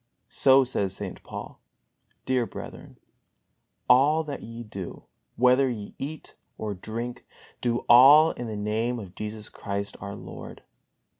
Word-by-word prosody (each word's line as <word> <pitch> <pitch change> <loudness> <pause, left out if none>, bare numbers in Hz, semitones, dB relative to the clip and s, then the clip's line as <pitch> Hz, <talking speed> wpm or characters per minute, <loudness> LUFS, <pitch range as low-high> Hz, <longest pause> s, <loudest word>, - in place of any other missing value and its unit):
So 135 0 +5
says 100 -7 0
St. - - -6
Paul: - - -9 0.7
"Dear 125 -3 +1
brethren, - - -10 0.9
all 150 +5 +5
that 145 -2 -6
ye 115 +1 -8
do, 100 -5 -8 0.3
whether 125 +2 +4
ye 105 -4 -6
eat 150 +3 -6 0.2
or 105 -1 -3
drink, 115 +5 -6 0.4
do 120 -1 -1
all 140 +6 +8
in 120 - -6
the 110 -2 -5
Name 110 +4 -1
of 100 -6 -9
Jesus 105 +1 -6
Christ, 100 0 -4
our 100 -1 -6
Lord." - - -10
120 Hz, 135 wpm, -26 LUFS, 105-130 Hz, 0.9 s, all